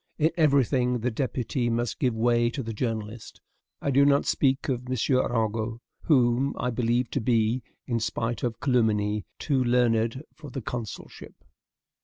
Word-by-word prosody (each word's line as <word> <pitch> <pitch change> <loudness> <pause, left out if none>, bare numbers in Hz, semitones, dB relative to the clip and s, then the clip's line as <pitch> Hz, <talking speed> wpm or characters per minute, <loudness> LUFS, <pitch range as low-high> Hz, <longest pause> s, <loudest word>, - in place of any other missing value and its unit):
In 160 +2 +2
every 140 -5 +4
thing 125 -1 0
the 125 +2 0
deputy 125 0 -2
must 120 0 -2
give 125 -7 +1
way 120 +1 +2
to 135 +2 -4
the 115 0 -5
journalist. 110 -1 -4 0.4
I 140 - +1
do 140 +2 +5
not 140 0 +3
speak 135 -1 +1
of 125 -2 -2
M. 130 - -1 0.2
Arago, 115 -2 0 0.3
whom 130 -2 +3
I 125 - -1
believe 120 0 0
to 135 - -1
be, 115 +1 +1 0.2
in 115 -2 -1
spite 115 +1 -2
of 115 -2 -2
calumny, 105 - +1
too 135 -4 0
learned 120 +1 +1
for 150 -2 -11
the 135 0 -5
consulship. 115 -2 -7
120 Hz, 160 wpm, -26 LUFS, 115-130 Hz, 0.4 s, do